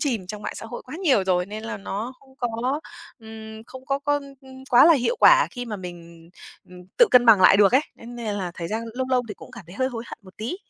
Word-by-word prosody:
chìm 235 - -2
trong 210 +2 -8
mạng - - -5
xã 225 - -8
hội 240 - -8
quá 260 +5 -9
nhiều 275 - +2
rồi 180 -1 +1
nên 215 +2 -7
là 225 - -5
nó 205 +5 -5
không 265 -1 -22
có, 245 +4 -2 0.4
ừm, 220 0 -11
không 260 0 -12
có 275 0 0
có 290 0 0 0.5
quá 245 - +7
là 335 - +7
hiệu 305 - 0
quả - - +7
khi 245 -1 -6
mà 220 -3 -5
mình, 170 -2 -11 0.4
ừm, 180 0 -13 0.2
tự 480 - +7
cân 250 -1 +5
bằng 215 -4 +7
lại 190 - +7
được 200 0 +5
ấy, 265 - +5
nên 240 +1 -11
nên 220 -3 -4
là 185 -3 -4
thời 170 -1 -6
gian 220 +2 -3
lâu 260 +1 -2
lâu 250 -1 +2
thì 210 - -6
cũng - - -14
cảm 190 - -12
thấy 175 - -13
hơi 260 +1 0
hối 235 -2 -7
hận - - -10
một 185 -1 -17
tí. 235 +12 -4
225 Hz, 265 wpm, -23 LUFS, 200-260 Hz, 0.5 s, quá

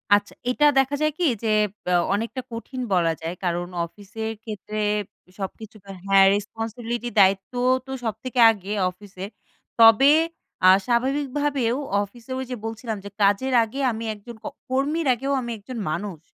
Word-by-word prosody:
আচ্ছা 205 0 -2 0.2
এইটা 295 +4 +2
দেখা 270 +2 +1
যায় 305 0 +2
কি? 360 - -1 0.2
যে - - 0 0.4
ব্যা 180 - +2 0.2
অনেকটা 230 +5 -2
কঠিন 245 +3 -6
বলা 170 -3 +3
যায়। 165 +2 -4
কারণ 175 0 -1 0.2
অফিসের 210 +5 -7
ক্ষেত্রে 215 -1 -6 0.6
সবকিছুতে 200 0 -8 0.2
হ্যাঁ, 195 0 +6
রেসপনসিবিলিটি 230 +3 -4
দায়িত্ব 195 +2 +3 0.3
তো 265 - -9
সব 225 -2 -1
থেকে 255 -1 -3
আগে, 205 -1 -6 0.2
অফিসের। 190 +1 -9 0.5
তবে 225 +5 +8 0.6
আ - - +10 0.2
স্বাভাবিকভাবেও 270 0 0 0.3
অফিসে 230 +5 -12
ওইযে 260 -1 -4
বলছিলাম 225 0 -4
যে, - - -6
"কাজের 205 +7 +2
আগে 225 +5 -6
আমি 225 0 -5
একজন 215 +3 -11
ক - - -13 0.2
কর্মীর 285 +5 0
আগেও 270 +3 -3
আমি 240 -1 -5
একজন 225 +4 -9
মানুষ। 190 -1 -4
225 Hz, 145 wpm, -24 LUFS, 200-255 Hz, 0.6 s, আ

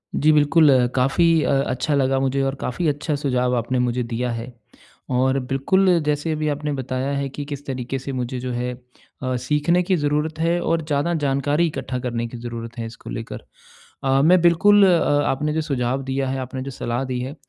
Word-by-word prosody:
जी 155 +2 +4
बिल्कुल 150 +1 +5
अ, 130 -2 +4
काफ़ी 135 +6 +2 0.2
अ, - - +1 0.2
अच्छा 130 +4 -1
लगा 135 -1 +2
मुझे 135 +1 0
और 135 0 -1
काफ़ी 165 +6 -2
अच्छा 150 +1 -1
सुझाव 125 -3 0
आपने 125 +2 -1
मुझे 125 0 0
दिया 120 +1 -2
है। 115 +2 -6 0.6
और 130 +2 +2
बिल्कुल 185 +9 +2 0.2
जैसे 150 +2 0
अभी 155 0 -1
आपने 150 +1 -2
बताया 130 0 -3
है 140 0 -1
कि 145 +2 -6
किस 145 -1 -7
तरीके 130 0 -4
से 135 +2 -6
मुझे 125 0 -3
जो 125 0 -4
है 125 +1 -2 0.5
अ, 130 0 -1
सीखने 150 +7 +1
की 185 +1 +1
ज़रूरत 150 +1 -1
है 170 +2 +1
और 165 -1 0
ज़्यादा 150 +2 0
जानकारी 145 +4 +1
इकट्ठा 130 -4 -4
करने 120 -2 -3
की 120 +1 -9
ज़रूरत 115 0 -7
है 115 - -4
इसको 115 0 -10
लेकर। 115 - -6 0.6
अ, 135 0 +3
मैं 180 +4 +5
बिल्कुल 200 +4 +5
अ, 175 -3 +4 0.3
आपने 150 +3 0
जो 160 - 0
सुझाव 135 -3 -1
दिया 135 0 -2
है, 135 0 -2
आपने 130 0 -5
जो 135 - -5
सलाह 120 0 -3
दी 130 -1 -3
है, 130 +3 -5
135 Hz, 200 wpm, -22 LUFS, 125-150 Hz, 0.6 s, बिल्कुल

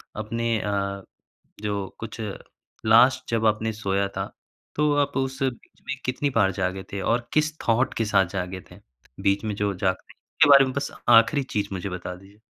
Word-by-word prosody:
अपने 115 +2 -1
अ, 100 -1 -2 0.6
जो 100 -2 -2
कुछ 115 0 -7 0.6
लास्ट 115 +4 +5
जब 115 -1 0
आपने 110 +1 +2
सोया 100 -2 -1
था, - - -3 0.4
तो 150 0 +2
आप 140 0 -7
उस 135 0 -2
बीच 130 -3 -5
में 140 - -2
कितनी 130 +3 0
बार 95 - +3
जागे 95 0 -2
थे 100 - -3
और 120 +4 0
किस 155 0 +1
थॉट 120 +3 +2
के 115 - 0
साथ 100 -2 +3
जागे 90 0 -4
थे। 90 - -13 0.4
बीच 100 +2 +2
में 105 -2 -2
जो 100 -1 -1
जागते 95 0 -1
हैं। - - -49 0.2
इसके 150 -3 +7
बारे 140 -1 +9
में 130 - -4
बस 140 - -3 0.2
आख़िरी 120 +5 +6
चीज़ 105 -5 -2
मुझे 95 +1 -4
बता 90 0 -6
दीजिए। 100 +3 -18
110 Hz, 185 wpm, -25 LUFS, 100-125 Hz, 0.6 s, बारे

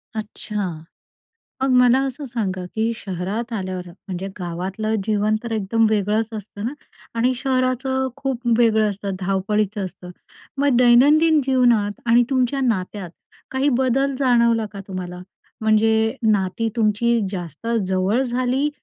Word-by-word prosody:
अच्छा. 210 -3 -4 0.9
मग 265 - +2
मला 250 +1 +5
असं 275 +3 -5
सांगा 195 -7 -3
की 225 +1 0
शहरात 200 +5 -4
आल्यावर, 185 -3 -4
म्हणजे 185 +1 -7
गावातलं 185 +5 -3
जीवन 215 0 +1
तर 235 - -6
एकदम 220 +2 +1
वेगळंच 215 +1 +1
असतं 205 0 -7
ना 260 - -2 0.5
आणि 250 +3 +3
शहराचं 260 0 0
खूप 265 -3 -3 0.2
वेगळं 220 -2 +4
असतं, 200 -1 -4
धावपळीचं 195 +2 -1
असतं. 180 -1 -9 0.5
मग 280 -3 +3
दैनंदिन 295 +6 +5
जीवनात 240 -6 +2
आणि 235 +1 +5
तुमच्या 260 +1 +1
नात्यात 195 -6 -2 0.4
काही 265 +2 +1
बदल 265 +1 +1
जाणवला 235 -4 +3
का 200 - -7
तुम्हाला? 180 -1 -6 0.4
म्हणजे 220 +2 +2 0.2
नाती 205 +3 0
तुमची 230 +2 +2
जास्त 175 0 -7 0.2
जवळ 190 +6 +1
झाली 255 +3 0
220 Hz, 130 wpm, -21 LUFS, 195-250 Hz, 0.9 s, मला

